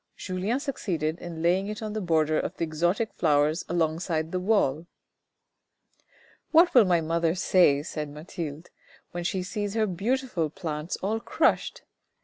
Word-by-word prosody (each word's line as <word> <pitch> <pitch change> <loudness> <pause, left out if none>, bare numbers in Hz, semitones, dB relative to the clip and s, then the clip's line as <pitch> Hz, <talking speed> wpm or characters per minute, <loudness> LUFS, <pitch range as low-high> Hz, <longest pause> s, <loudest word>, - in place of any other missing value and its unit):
Julien 190 +7 -2
succeeded 175 - -2
in 165 -2 -7
laying 185 +3 +2
it 210 +1 -5
on 215 -1 -4
the 215 - -2
border 155 -3 +2
of - - -4
the - - -2
exotic 175 +7 0
flowers 150 +1 +2
along 165 -2 0
side 160 -3 -2
the 185 - -1
wall. 175 -6 +1 0.8
" - - -55 0.8
What 340 +2 +6
will 245 -5 +7
my 175 -2 +3
mother 165 +1 0
say," 175 -6 +4
said 150 -2 -5
Mathilde, 155 +1 -7 0.2
" - - -28
when 175 0 -4
she 185 +1 -1
sees 205 +2 -4
her 220 -1 +2
beautiful 210 -2 -1
plants 155 0 -4
all 215 +3 0
crushed - - 0
175 Hz, 160 wpm, -27 LUFS, 160-205 Hz, 0.8 s, will